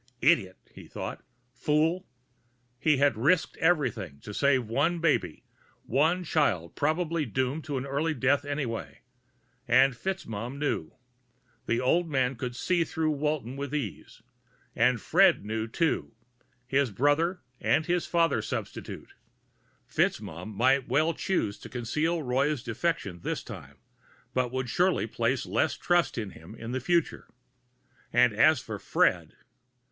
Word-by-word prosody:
Idiot! 115 - +3 0.2
he - - -12
thought. - - -6 0.3
Fool! 155 +8 +1 0.7
He 150 0 +3
had 140 -1 +3
risked 155 +11 +2
everything 120 - 0
to 105 - -8
save 130 0 +2
one 145 +10 +1
baby, 165 -3 0 0.4
one 160 +8 +2
child 115 - 0
probably 160 +2 0
doomed 130 +4 -2
to 145 -2 -3
an 130 - -3
early 150 +4 -1
death 135 +3 +2
anyway. 140 -6 -4 0.7
And 130 +3 +5
FitzMaugham 120 - -4
knew 140 - -2 0.7
the 115 - +1
old 165 +6 +2
man 130 -2 +1
could 125 0 -5
see 175 +5 +1
through 160 -1 -1
Walton 150 -4 -2
with 140 +1 -4
ease 120 - -5 0.5
and 120 +1 +3
Fred 100 - +4
knew, 110 +1 -2
too. 160 +7 -1 0.5
His 135 +1 +1
brother, 145 - +1 0.2
and 155 - +2
his 175 0 0
father 170 -1 +2
substitute. - - -6 0.7
FitzMaugham 90 +7 -1
might 130 +4 +3
well 155 +3 +2
choose 110 - -1
to - - -10
conceal 150 +7 -1
Roy's 135 +1 0
defection 120 - -2
this - - -3
time, - - -10 0.6
but 125 -1 0
would 130 0 -2
surely 180 - +2
place 115 +2 -1
less 100 +6 0
trust 175 -5 +1
in 105 -4 -3
him 85 +7 -12
in 115 +1 -7
the 130 - -1
future. 170 +5 0 0.8
And 120 -1 +4
as 155 +7 +5
for 110 -5 -6
Fred.... - - +1
135 Hz, 135 wpm, -28 LUFS, 115-160 Hz, 0.8 s, And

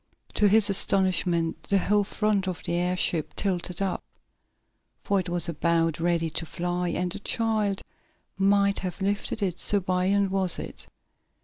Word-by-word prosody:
To 210 - +3
his 210 +1 +6
astonishment 185 -4 +1
the 200 - +3
whole 205 +2 +2
front 205 -1 -1
of 180 -2 -4
the - - -3
airship 175 -3 -1
tilted 180 -1 -1
up, 190 - -2 1.0
for 200 - +1
it 185 - -4
was 175 -1 +2
about 165 0 0
ready 165 -1 0
to 165 - -3
fly, 175 +1 -2
and 180 0 -2
a 205 - -5
child 215 -2 -1 0.5
might 200 0 +2
have 180 -2 -5
lifted 200 +2 -2
it, 180 -3 -2
so 205 - +2
buoyant 185 +2 0
was 190 -2 +3
it. - - -7
185 Hz, 150 wpm, -26 LUFS, 175-200 Hz, 1.0 s, his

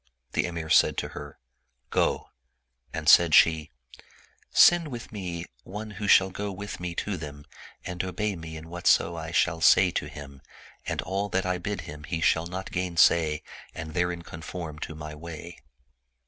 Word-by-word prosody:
The - - 0
Emir 85 -2 -5
said - - +5
to - - -2
her, 75 -1 -9 0.3
" 65 -1 -48 0.2
Go - - 0 0.3
"; 60 -1 -45
and - - -5
said 85 -3 +7
she, 80 -2 +5 0.4
" - - -26 0.2
Send 175 -2 +6
with 120 -5 -7
me 90 -5 -5 0.2
one 105 +3 -7
who 105 0 -5
shall 95 -1 +6
go 100 +2 -4
with 100 +2 -7
me 90 -1 -4
to 100 +1 -2
them 75 -2 -8 0.4
and 90 0 -3
obey 100 +3 -2
me 80 -1 -8
in 80 +1 -10
whatso 85 0 +2
I 80 -1 -5
shall 80 0 +1
say 90 +2 +6
to - - -2
him, 70 -2 -10 0.5
and - - -2
all 100 +2 -2
that 95 0 0
I 90 -1 -1
bid 100 +1 -3
him 75 -2 -9
he 80 - -3
shall 80 +1 +2
not 95 +2 -6
gainsay 85 -3 +3 0.3
and 80 -1 -6
therein 90 0 -1
conform 80 -1 -7
to 80 - -6
my 75 0 -7
way." 85 +2 -9
85 Hz, 180 wpm, -27 LUFS, 80-95 Hz, 0.5 s, said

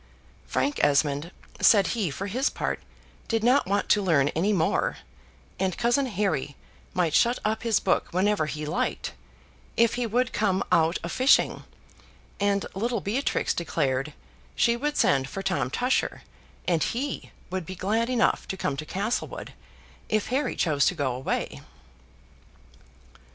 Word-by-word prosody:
Frank 290 +1 0
Esmond 145 +2 +2 0.3
said 205 -3 +6
he 215 -7 0
for 150 +8 -5
his 250 +8 0
part - - -3 0.5
did 225 -1 0
not 250 0 +4
want 200 +1 0
to 210 - +4
learn 150 -7 +3
any 180 +8 0
more, 170 -6 +1 0.6
and 190 -2 0
cousin 240 +3 +2
Harry 195 - -1 0.4
might 175 -4 +1
shut 240 +1 +4
up 215 +1 0
his 230 -3 +2
book - - +1
whenever 185 -2 +1
he 150 0 -4
liked, 150 - -2 0.6
if 230 -1 +4
he 245 -1 -1
would 245 +3 0
come 195 -3 +1
out 165 +1 +3
a 170 - -3
fishing; 260 +9 +3 0.7
and 200 -1 +1
little 230 +4 -1
Beatrix 225 +9 0
declared 140 -4 -1 0.4
she 235 0 +3
would 295 +4 -2
send 135 -1 +3
for 195 - -5
Tom 185 -10 0
Tusher, 250 - 0 0.4
and 170 -3 +2
HE 265 - -2 0.2
would 185 -3 -3
be 185 - -6
glad 220 +6 0
enough 250 -2 +1
to 190 - -4
come 140 - -1
to 155 +1 -5
Castlewood, 205 +5 -3 0.6
if 215 -1 0
Harry 270 +4 0
chose 145 -5 +2
to - - +1
go 140 -5 -1
away. 130 +2 -3
195 Hz, 150 wpm, -26 LUFS, 160-235 Hz, 0.7 s, said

